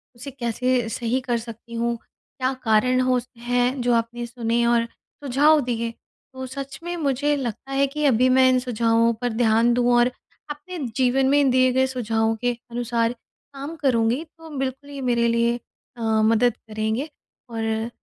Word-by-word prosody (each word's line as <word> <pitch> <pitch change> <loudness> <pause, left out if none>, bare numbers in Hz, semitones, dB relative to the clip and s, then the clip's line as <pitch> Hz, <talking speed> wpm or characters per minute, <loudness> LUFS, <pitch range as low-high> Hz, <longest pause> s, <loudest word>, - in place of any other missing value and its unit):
उसे 260 +4 -8
कैसे 245 -1 -1
सही 240 +3 -1
कर 240 -2 -1
सकती 230 0 -9
हूँ, 235 0 0
क्या 260 +3 -5
कारण 250 +3 +3
हो 255 -1 +2
स 245 - -11
हैं, 245 +2 0
जो 245 0 +2
आपने 235 +1 -1
सुने 235 -1 -1
और 235 -1 +3 0.4
सुझाव 290 +4 +4
दिए। 235 -2 -2 0.4
तो 260 0 -6
सच 275 +1 -7
में 350 0 -3
मुझे 290 0 +1
लगता 265 0 -5
है 275 +1 +2
कि 300 +2 -2
अभी 255 -1 +4
मैं 260 0 +5
इन 255 0 +3
सुझावों 230 -1 +2
पर 245 - 0
ध्यान 230 +1 +3
दूँ 245 0 +2
और 240 +1 +4 0.4
अपने 300 +5 -7 0.2
जीवन 260 +1 +3
में 285 - +4
इन 280 -2 +4
दिए 255 0 +4
गए 260 0 +3
सुझावों 225 -3 0
के 245 0 +2 0.2
अनुसार 235 -1 0 0.4
काम 280 +4 -6
करूँगी, 250 -1 +1
तो 325 0 -15
बिल्कुल 270 +2 -4
ये 280 -1 -7
मेरे 240 -2 +2
लिए 235 +1 +1 0.4
अ, - - -8 0.2
मदद 230 +1 +3
करेंगे। 220 +6 -3 0.4
और 225 0 -2
245 Hz, 175 wpm, -23 LUFS, 230-265 Hz, 0.4 s, मैं